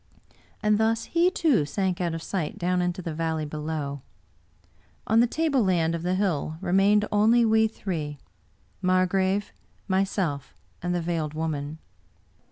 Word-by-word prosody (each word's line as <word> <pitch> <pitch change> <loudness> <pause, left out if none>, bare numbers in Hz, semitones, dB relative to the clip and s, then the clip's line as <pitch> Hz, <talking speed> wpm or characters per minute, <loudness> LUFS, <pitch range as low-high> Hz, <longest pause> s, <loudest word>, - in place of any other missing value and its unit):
And 210 0 +3
thus 225 +1 +2
he, 340 +6 +2
too, 310 - +2
sank 185 +4 -1
out 170 -2 -1
of 165 - -6
sight 175 -6 -3
down 180 +1 0
into 180 +1 -2
the 165 - -4
valley 160 -1 -2
below. 150 -2 -4 1.0
On 225 +2 +3
the 240 - +5
table 300 -1 +1
land 170 -4 +2
of 170 - -3
the 180 +2 0
hill 170 -5 -1
remained 195 +3 +3
only 225 +3 +4
we 220 0 +4
three 160 -9 -4 0.3
— - - -38
Margrave, 185 +2 +1 0.3
myself, 190 -7 -1 0.3
and 175 0 -1
the 175 - 0
Veiled 160 -3 -2
Woman. 155 -1 -3
185 Hz, 150 wpm, -26 LUFS, 160-210 Hz, 1.0 s, the